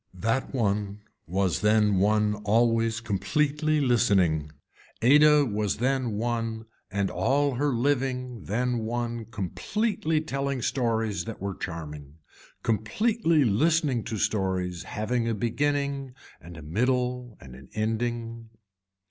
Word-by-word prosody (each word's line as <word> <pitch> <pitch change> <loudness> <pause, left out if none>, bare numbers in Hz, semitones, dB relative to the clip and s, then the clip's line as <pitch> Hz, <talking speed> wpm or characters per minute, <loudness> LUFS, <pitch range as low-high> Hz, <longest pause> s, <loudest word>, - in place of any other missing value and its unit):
That 115 +8 -1
one 105 -4 -1 0.2
was 95 +1 0
then 105 -2 +3
one 105 +1 +3
always 115 +1 +2
completely 150 +8 0
listening. 95 - +2 0.5
Ada 150 +3 +6
was 105 -4 -1
then 130 -1 0
one 115 0 -2 0.2
and 100 -1 -1
all 140 +3 +1
her 145 +4 0
living 125 -2 -1
then 120 +3 0
one 120 0 -3
completely 155 - -1
telling 140 -4 -2
stories 110 -9 0
that 115 - -7
were 100 0 -3
charming, 75 -5 -7 0.5
completely 165 - +1
listening 140 +2 +2
to 110 - -3
stories 95 -4 -1
having 115 +4 -1
a 115 - 0
beginning 140 +3 -1 0.3
and 85 +2 -11
a 80 - -9
middle 125 - -1
and 65 -1 -12
an 65 +1 -13
ending. 115 +1 -2
115 Hz, 115 wpm, -27 LUFS, 105-130 Hz, 0.5 s, Ada